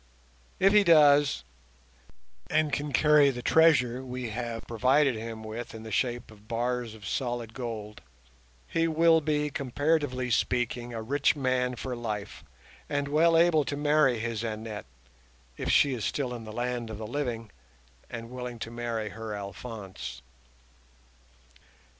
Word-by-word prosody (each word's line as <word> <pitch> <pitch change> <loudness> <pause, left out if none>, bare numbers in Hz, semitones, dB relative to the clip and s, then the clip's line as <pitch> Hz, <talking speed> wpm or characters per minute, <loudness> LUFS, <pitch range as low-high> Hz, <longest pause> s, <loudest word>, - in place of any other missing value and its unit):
If 195 +2 +5
he 210 -1 +7
does, 145 - +5 1.1
and 155 -2 +1
can 145 0 -1
carry 150 +1 +5
the 125 -2 -4
treasure 130 -6 +4
we 125 -2 -5
have 115 0 -4
provided 130 +4 +3
him 110 0 -6
with 110 +2 -6
in 110 - -8
the 110 - -8
shape 120 -1 -1
of 105 0 -18
bars 120 0 -2
of 105 -2 -12
solid 120 -2 -3
gold, 110 - -6 0.7
he 165 0 +1
will 165 0 +4
be, 150 -1 0
comparatively 140 -1 0
speaking, 120 +1 0
a 115 -1 -5
rich 140 +6 +2
man 130 -2 0
for 125 +1 -4
life, 105 -6 -5 0.5
and 145 -1 -1
well 165 +3 +4
able 165 -2 +4
to 145 - -4
marry 145 -4 +3
his 115 0 -3
Annette, 110 - -5 0.7
if - - -4
she 140 -2 +4
is 115 -4 -4
still 125 +7 -1
in 115 -2 -7
the 110 - -8
land 120 0 -3
of 110 - -6
the 110 - -6
living 115 -3 -3 0.6
and 115 0 -7
willing 125 -1 -6
to 115 0 -6
marry 115 -2 -3
her 110 0 -6
Alphonse. 95 - -7
125 Hz, 145 wpm, -28 LUFS, 115-145 Hz, 1.1 s, he